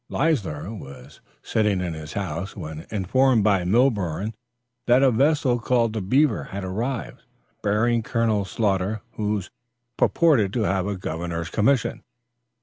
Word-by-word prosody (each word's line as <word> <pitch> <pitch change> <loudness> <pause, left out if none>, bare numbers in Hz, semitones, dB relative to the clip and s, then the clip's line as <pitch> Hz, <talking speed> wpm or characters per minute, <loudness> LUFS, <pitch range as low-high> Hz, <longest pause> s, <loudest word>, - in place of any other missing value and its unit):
Leisler 110 - -1
was 70 - -11 0.2
sitting 105 -3 +1
in 90 -2 -2
his 80 -1 -8
house 90 -1 -4
when 80 -4 -7
informed 115 +4 +2
by 100 -3 +3
Milborne 105 - +1 0.5
that 125 +2 +5
a 135 - +5
vessel 135 0 +2
called 115 -1 +1
The 110 - -2
Beaver 130 +5 +2
had 100 0 -6
arrived, 115 +8 -4 0.4
bearing 115 +3 +2
Colonel 110 -3 0
Sloughter, 100 +1 -1
who 105 -2 -2 0.5
purported 130 - +3
to 115 - 0
have 95 -1 0
a 100 -1 -2
governor's 85 -1 -4
commission. 125 +3 +1
105 Hz, 135 wpm, -24 LUFS, 95-120 Hz, 0.5 s, that